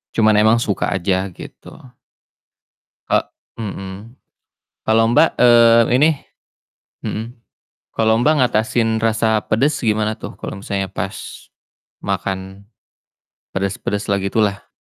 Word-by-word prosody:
Cuman 110 -1 +4
emang 110 +2 +4
suka 100 - -1
aja 95 +1 -1
gitu. - - -11 1.4
Ka - - 0 0.3
mhm, 100 +3 -7 0.7
kalo 110 +1 +4
Mbak, - - +5
eee, 115 -1 +6
ini 150 +5 +5 0.9
mhm, 110 - -3 0.7
kalo 110 0 +2
Mbak 150 +5 +4
ngatasin 110 -1 +1
rasa 110 -1 +1
pedes 140 +8 +1
gimana 110 -1 0
tuh, - - -8
kalo - - -7
misalnya 95 -1 -3
pas 95 0 -6 0.6
makan 95 +1 -4 0.9
pedes-pedes 100 +1 -3
lah 100 - +2
gitu 100 +3 -2
lah, 100 -1 -3
110 Hz, 110 wpm, -19 LUFS, 100-115 Hz, 1.4 s, eee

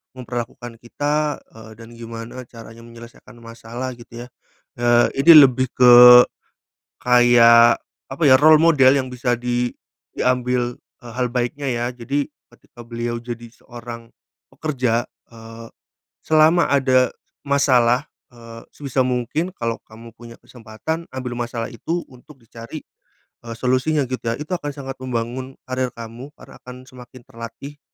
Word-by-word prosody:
memperlakukan 120 -1 -7
kita, 145 +4 -2
eee, 110 0 -14
dan 115 +1 -14
gimana 115 +2 -9
caranya 115 -1 -13
menyelesaikan 115 +1 -15
masalah 115 +2 -7
gitu 120 0 -11
ya. - - -15 0.5
Eee, 120 0 +3
ini 165 +5 +7
lebih 130 0 -1
ke, 125 -1 +8 1.0
kayak, 120 -1 +5 0.3
apa 140 +5 -7
ya, 130 - +7
role 155 +1 +6
model 150 -6 +5
yang 130 -1 -3
bisa 125 -1 -2
di 120 0 -2 0.4
diambil, 125 -1 -1 0.3
eee, 120 -1 -12
hal 125 0 -1
baiknya 125 +3 -3
ya. 120 0 -2
Jadi, 135 +4 -3 0.2
ketika 120 0 -17
beliau 120 0 -5
jadi 120 -1 -8
seorang 115 -1 -11 0.4
pekerja, 125 -6 -2 0.2
eee, 115 0 -12 0.6
selama 160 +2 +4
ada 130 -3 +2 0.4
masalah, 130 -1 +2 0.3
eee, 115 -1 -13
sebisa 135 -2 -2
mungkin 125 +8 -2
kalau 115 -1 -4
kamu 115 +1 -14
punya 115 -1 -12
kesempatan, 125 +8 -7
ambil 125 -2 -6
masalah 120 -1 -4
itu, 170 +1 -4
untuk 130 +3 -18
dicari, 115 +6 -10 0.7
eee, 115 - -6
solusinya 130 +4 0
gitu 130 0 -6
ya. 115 - -1
Itu 155 +4 -6
akan 145 0 -5
sangat 135 -1 -7
membangun 130 +1 -5
karir 130 0 -2
kamu, 115 +5 -10
karena - - -16
akan 125 0 -11
semakin 125 -1 -15
terlatih, 135 +5 -11
120 Hz, 135 wpm, -20 LUFS, 115-130 Hz, 1.0 s, ke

